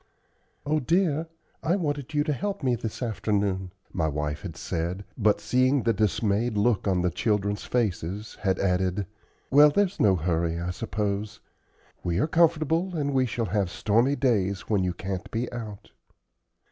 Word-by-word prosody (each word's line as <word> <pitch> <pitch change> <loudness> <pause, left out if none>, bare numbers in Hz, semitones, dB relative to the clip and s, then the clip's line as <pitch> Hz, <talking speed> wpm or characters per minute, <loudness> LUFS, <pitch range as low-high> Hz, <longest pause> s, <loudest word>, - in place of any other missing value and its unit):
"Oh, 155 +2 +2
dear, 165 +1 +1 0.3
I 170 +3 +1
wanted 145 -5 -3
you 145 - +3
to 150 -1 0
help 195 +2 -3
me 130 -2 +2
this 115 +1 -4
afternoon," 100 -4 -1 0.2
my 80 -3 0
wife 75 0 -2
had - - -7
said, 90 +4 -3
but, 105 -3 +2
seeing 130 +1 +2
the 115 - +2
dismayed 105 +2 +1
look 105 0 +2
on 90 -2 +2
the 90 - +1
children's 105 0 0
faces, 105 -3 -2
had 95 -3 +1
added, 95 +1 0 0.5
"Well, 145 +2 +8
there's 200 +4 +1
no 100 -3 +5
hurry, 85 0 0
I 85 +1 -2
suppose. 100 +3 -3 0.6
We 85 -1 0
are 105 - +3
comfortable, 165 +2 +2
and 145 -3 -1
we 130 -1 +2
shall 115 0 -2
have 100 -4 +1
stormy 115 +9 +2
days 100 -8 +1
when 100 -4 0
you 90 -1 0
can't 95 0 -5
be 115 +2 -3
out." 110 -4 -7
105 Hz, 160 wpm, -26 LUFS, 95-140 Hz, 0.6 s, Well